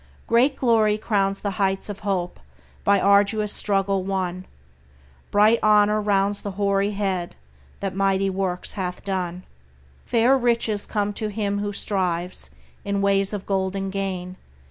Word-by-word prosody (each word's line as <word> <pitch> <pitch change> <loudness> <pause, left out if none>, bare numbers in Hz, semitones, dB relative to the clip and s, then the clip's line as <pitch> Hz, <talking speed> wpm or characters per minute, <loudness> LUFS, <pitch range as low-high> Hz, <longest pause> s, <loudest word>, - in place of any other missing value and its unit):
Great 250 +4 +3
glory 220 -5 +2
crowns 195 -2 0
the 200 - -2
heights 195 0 +1
of 205 -2 -6
hope 190 -3 -2 0.4
by 200 0 +4
arduous 205 +2 +3
struggle 195 -1 0
won; 185 -1 -3 0.8
Bright 215 +3 +4
honor 210 0 +4
rounds 200 -1 +1
the 205 - -4
hoary 200 0 +1
head 190 -4 -2 0.5
that 195 -1 -2
mighty 195 0 +1
works 190 -1 -1
hath 180 -2 -5
done; 185 -2 -3 0.6
Fair 240 +3 +4
riches 230 -4 +1
come 205 -1 -1
to 215 - -2
him 205 -1 -2
who 205 0 -2
strives 180 -3 -1 0.3
in 200 0 -1
ways 195 0 +2
of 205 -2 -5
golden 195 0 -2
gain. 185 -2 -4
200 Hz, 140 wpm, -23 LUFS, 190-210 Hz, 0.8 s, by